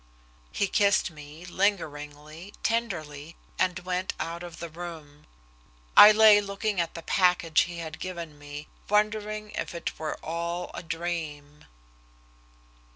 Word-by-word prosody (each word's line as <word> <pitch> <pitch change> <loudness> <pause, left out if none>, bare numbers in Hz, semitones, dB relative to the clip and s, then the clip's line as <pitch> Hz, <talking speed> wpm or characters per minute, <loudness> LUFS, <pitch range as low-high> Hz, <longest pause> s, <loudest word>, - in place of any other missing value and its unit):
He 200 - 0
kissed 200 -2 +3
me, 150 +2 -11
lingeringly, 160 -2 -3
tenderly, 165 -10 -2 0.2
and 185 -1 +2
went 185 +1 -2
out 170 +1 -4
of 175 -2 -8
the 170 - -6
room. 160 -3 -9 0.7
I 210 - +11
lay 215 -1 +7
looking 200 -1 -1
at 165 - -4
the 165 - -7
package 180 -4 +3
he 175 -1 -8
had 160 -1 -6
given 170 -5 -6
me, 145 +1 -8 0.2
wondering 210 0 0
if - - -4
it 170 - -5
were 155 - -3
all 170 +2 -3
a - - -5
dream. 160 -4 -5
170 Hz, 130 wpm, -27 LUFS, 155-195 Hz, 0.7 s, I